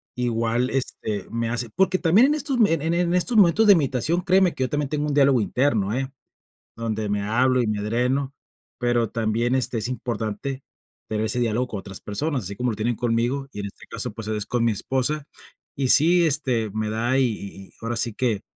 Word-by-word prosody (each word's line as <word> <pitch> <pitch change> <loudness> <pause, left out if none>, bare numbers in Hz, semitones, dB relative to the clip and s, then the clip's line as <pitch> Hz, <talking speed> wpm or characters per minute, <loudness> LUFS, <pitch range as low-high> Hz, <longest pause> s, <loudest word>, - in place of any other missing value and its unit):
igual, 120 0 0
este, 110 -6 -3
me 115 0 -2
hace 120 -1 -1
Porque 190 0 +2
también 190 +10 +5
en 295 - +2
estos, 285 -4 -2
en 165 -3 0
en 175 0 +1
estos 200 +7 0
momentos 200 +2 +5
de 205 - +8
imitación, 155 +2 0
créeme 185 -1 +3
que 130 - -2
yo 130 - -1
también 145 -2 -1
tengo 150 0 -1
un 145 - -1
diálogo 135 -4 +4
interno, 110 -3 +1
¿eh?, 135 +2 -2 0.6
donde 110 -2 -3
me 100 0 -1
hablo 125 +5 +2
y - - 0
me 105 -1 -1
dreno. 125 +5 0 0.4
Pero 120 -2 +1
también, 115 +2 0
este, 130 -2 -1
es 105 - -3
importante 120 +1 -4 0.5
tener 110 0 -1
ese 115 +3 0
diálogo 120 +1 0
con 105 - -5
otras 95 0 -9
personas, 135 +5 -2
así 100 +2 -6
como 125 +4 -1
lo - - -4
tienen 110 +2 -1
conmigo, 120 +4 -1
y 105 - -6
en - - -5
este - - -14
caso, - - -3
pues, 110 -2 -7
es 105 -2 -2
con 120 -1 -1
mi 115 - +2
esposa. 135 +7 -1 0.5
Y 135 -2 0
sí, 170 +5 +5
este, 130 -7 0
me 110 +1 -2
da 120 +4 0
y 135 - +4
y 105 -4 -4
y - - -23
ahora 115 +1 -3
sí 115 -1 +1
que 115 -4 -1
125 Hz, 210 wpm, -23 LUFS, 110-140 Hz, 0.6 s, de